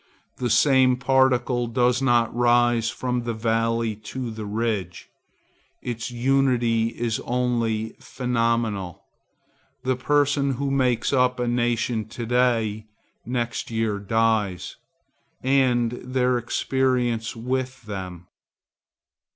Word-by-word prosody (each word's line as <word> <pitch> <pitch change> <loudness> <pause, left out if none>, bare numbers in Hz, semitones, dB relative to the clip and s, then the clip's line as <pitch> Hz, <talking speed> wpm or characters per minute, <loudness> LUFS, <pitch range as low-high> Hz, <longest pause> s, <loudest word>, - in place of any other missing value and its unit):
The 125 - -2
same 130 +2 +4
particle 130 -2 +2
does 120 +2 +1
not 120 -3 +2
rise 120 -1 +3
from 125 +1 -2
the 120 -1 -3
valley 115 0 0
to 115 +3 -6
the 110 -1 -6
ridge. 105 -5 -3 0.7
Its 120 -1 -4
unity 120 -2 +2
is 115 -1 -2
only 115 -3 -1
phenomenal. 115 -7 -1 0.8
The 130 0 +1
persons 140 +1 +1
who 140 +1 -1
make 125 -2 +1
up 125 -1 +2
a 125 - 0
nation 120 -2 0
to 120 +1 -6
day, 115 -3 +1 0.4
next 120 -1 -2
year 110 -2 -1
die, 110 -2 +1 0.9
and 125 -3 +2
their 125 0 0
experience 120 -1 0
with 130 +2 -3
them. 95 -4 -7
120 Hz, 105 wpm, -24 LUFS, 115-125 Hz, 0.9 s, same